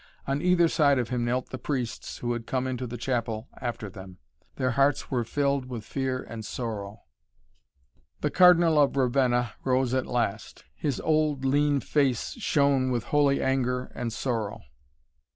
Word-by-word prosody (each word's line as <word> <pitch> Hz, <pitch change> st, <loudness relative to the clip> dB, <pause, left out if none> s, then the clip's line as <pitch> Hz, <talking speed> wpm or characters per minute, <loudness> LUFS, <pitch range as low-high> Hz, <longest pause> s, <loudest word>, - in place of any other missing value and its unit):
On 135 Hz, +1 st, -1 dB
either 180 Hz, -1 st, +4 dB
side 145 Hz, -4 st, +3 dB
of 120 Hz, -2 st, -1 dB
him 125 Hz, -2 st, -1 dB
knelt 125 Hz, +2 st, -1 dB
the 130 Hz, -, -5 dB
priests 125 Hz, -3 st, -4 dB
who 120 Hz, 0 st, -2 dB
had 115 Hz, -1 st, -6 dB
come 130 Hz, -1 st, -1 dB
into 130 Hz, -1 st, -3 dB
the 120 Hz, +1 st, -6 dB
chapel 115 Hz, -2 st, -2 dB
after 120 Hz, -3 st, -4 dB
them. 95 Hz, -1 st, -11 dB, 0.4 s
Their 130 Hz, -1 st, 0 dB
hearts 140 Hz, +3 st, +1 dB
were 125 Hz, -3 st, +1 dB
filled 140 Hz, +2 st, 0 dB
with 120 Hz, -4 st, -7 dB
fear 130 Hz, -1 st, -2 dB
and 115 Hz, -1 st, -8 dB
sorrow. 105 Hz, -3 st, -5 dB, 1.2 s
The -, -, 0 dB
Cardinal 175 Hz, -4 st, +6 dB
of 140 Hz, -1 st, +2 dB
Ravenna 125 Hz, -3 st, +2 dB
rose 130 Hz, -1 st, +1 dB
at 130 Hz, -1 st, 0 dB
last. 110 Hz, -3 st, -2 dB
His 140 Hz, -, -2 dB
old, 155 Hz, -3 st, +1 dB
lean 145 Hz, +1 st, +2 dB
face 135 Hz, -6 st, 0 dB
shone 140 Hz, -, +2 dB
with 120 Hz, -2 st, -1 dB
holy 145 Hz, -2 st, +3 dB
anger 125 Hz, -1 st, 0 dB
and 120 Hz, -1 st, -3 dB
sorrow. 115 Hz, -3 st, -3 dB
130 Hz, 160 wpm, -27 LUFS, 120-140 Hz, 1.2 s, Cardinal